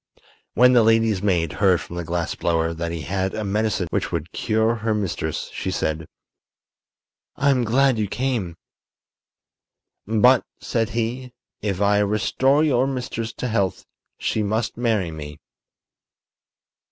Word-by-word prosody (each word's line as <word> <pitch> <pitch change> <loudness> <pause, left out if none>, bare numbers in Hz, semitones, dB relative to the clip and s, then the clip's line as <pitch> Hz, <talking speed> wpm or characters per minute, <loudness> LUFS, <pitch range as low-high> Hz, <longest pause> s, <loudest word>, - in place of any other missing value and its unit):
When 125 +2 +6
the 120 - +6
lady's 115 -3 +3
maid 85 -7 +1
heard 95 -2 +3
from 85 - -9
the 85 - -3
glass 85 +1 -2
blower 80 -1 0
that 85 +1 -4
he 85 -1 -4
had 95 +5 -2
a 110 - -3
medicine 105 -1 0
which - - -1
would - - -3
cure 110 +2 +1
her 110 0 -1
mistress, 100 -5 -3
she - - -3
said: 80 -3 -2 1.3
"I'm 135 -2 +2
glad 125 +1 +3
you 105 - 0
came." 115 -8 -2 1.5
"But," 115 +4 +5 0.2
said 115 -2 -1
he, 120 +2 -3 0.3
"if 100 -2 -2
I 100 0 +3
restore 120 +8 +2
your 130 -4 +2
mistress 125 -4 -3
to 125 - -4
health 100 -5 -1 0.3
she 110 - -1
must 110 +2 -1
marry 110 -8 0
me." 75 -2 -8
110 Hz, 140 wpm, -23 LUFS, 90-120 Hz, 1.5 s, When